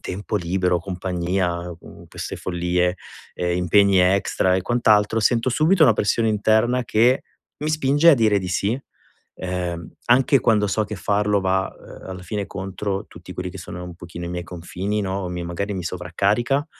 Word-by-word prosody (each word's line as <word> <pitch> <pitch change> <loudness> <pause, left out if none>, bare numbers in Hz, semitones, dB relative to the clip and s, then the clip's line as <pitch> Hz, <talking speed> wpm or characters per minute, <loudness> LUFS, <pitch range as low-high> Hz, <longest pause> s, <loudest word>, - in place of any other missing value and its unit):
tempo 100 +3 -5
libero, 90 -1 +1
compagnia, 90 -1 -2
mhmm, - - -14
queste - - -6
follie, 90 0 -1 0.4
ehm, 90 0 -1
impegni 100 +2 +4
extra 95 0 +2
e 95 - -1
quant'altro, 110 -1 +3
sento 115 +2 +2
subito 155 +6 +4
una 115 - +6
pressione 105 +2 +1
interna 110 +4 +2
che 120 +3 +3 0.4
mi 150 - -3
spinge 155 +2 +4
a - - +7
dire 110 -5 +3
di 90 - -5
sì, 100 +6 0 0.6
ehm, 90 -2 -4 0.2
anche 130 +2 +4
quando 105 -3 +3
so 100 +2 0
che 105 +1 -6
farlo 105 +1 +1
va, 95 0 0
ehm, - - -13
alla 95 -1 -7
fine 100 +2 -4
contro 95 +1 -4
tutti 90 +1 -12
quelli 90 0 -4
che 95 - -10
sono 90 0 -7
un 90 - -8
pochino 85 0 -9
i - - -5
miei 90 0 -4
confini, 90 +4 -4
no, 95 0 -2
o 90 - -4
mi 90 0 -4
magari 95 +4 -3
mi 95 -3 -4
sovraccarica. 100 - 0
95 Hz, 175 wpm, -22 LUFS, 90-110 Hz, 0.6 s, a